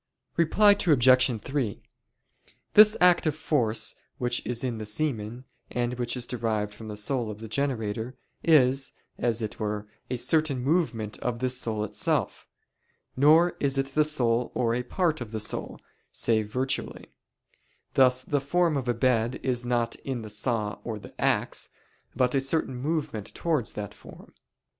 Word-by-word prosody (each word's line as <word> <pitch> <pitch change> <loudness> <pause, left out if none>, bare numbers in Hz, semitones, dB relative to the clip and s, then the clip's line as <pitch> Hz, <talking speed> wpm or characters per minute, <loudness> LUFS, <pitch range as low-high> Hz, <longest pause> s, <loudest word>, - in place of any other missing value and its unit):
Reply 205 +5 +5
Obj. 130 - +4
3: 130 -7 -2 0.9
This 215 0 +8
active 175 -4 +4
force 115 -8 0 0.2
which 120 -1 0
is 120 0 -2
in 120 -4 -2
the 110 - -5
semen, 115 0 -2 0.2
and 120 0 -1
which 120 +1 -1
is 125 - -3
derived 110 -4 -2
from 110 +1 -10
the 105 -1 -6
soul 115 +2 -1
of 105 - -6
the 110 +1 -8
generator, 115 -1 -2 0.3
is, 135 -4 +4 0.3
as 115 -1 0
it 105 - -5
were, 105 -1 -3 0.2
a 125 - -2
certain 155 +2 +2
movement 125 - -1
of 120 -1 -2
this 125 +1 -1
soul 110 -4 -1
itself: 105 - -1 0.7
nor 160 +6 +5
is 135 -1 0
it 135 0 -1
the 155 - +4
soul 125 -6 +1
or 115 -2 +1
a 120 - 0
part 155 +3 -1
of 115 -3 -6
the 110 - -3
soul, 105 - -4 0.3
save 110 -2 0
virtually; 130 +3 -3 0.8
thus 130 -1 +4
the 145 0 0
form 170 +3 +1
of 130 -2 -3
a 120 - +1
bed 120 0 +1
is 125 -2 -1
not 120 -1 0
in 130 -4 -5
the 110 - -7
saw 105 -1 -1
or 110 -2 -4
the 100 - -12
axe, - - +1 0.5
but 125 0 +2
a 135 - +2
certain 135 -1 0
movement 135 -6 -2
towards 155 -9 -1
that 105 -1 -6
form. - - -14
125 Hz, 160 wpm, -27 LUFS, 110-140 Hz, 0.9 s, This